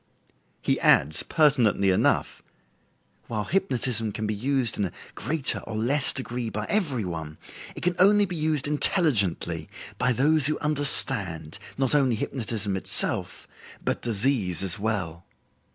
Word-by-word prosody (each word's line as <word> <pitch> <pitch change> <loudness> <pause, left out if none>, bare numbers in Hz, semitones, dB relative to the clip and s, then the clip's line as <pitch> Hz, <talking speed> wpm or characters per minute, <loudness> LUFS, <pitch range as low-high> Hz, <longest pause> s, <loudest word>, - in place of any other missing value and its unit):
He - - 0
adds 75 +2 +4
pertinently 125 - +2
enough: 90 - 0 0.9
"While 110 -2 -3
hypnotism 125 - -1
can 110 +2 -5
be 105 - -1
used 125 +1 0
in 100 - +1
a 90 - -5 0.2
greater 140 +3 +1
or 110 - -8
less 130 +6 +3
degree 125 -3 -4
by 105 0 -4
every 145 - 0
one, 80 -3 -6 0.4
it - - -9
can 180 0 0
only 205 +2 +5
be 180 -2 -6
used 155 -3 -1
intelligently 145 - +1 0.3
by 125 0 +2
those 145 +4 +2
who 155 - -1
understand, 120 - 0 0.2
not 135 -1 +1
only 135 -5 +2
hypnotism 110 -4 -3
itself, 95 - 0 0.4
but - - -1
disease 105 - 0
as 95 -1 -2
well." 95 -6 -3
120 Hz, 135 wpm, -25 LUFS, 100-145 Hz, 0.9 s, only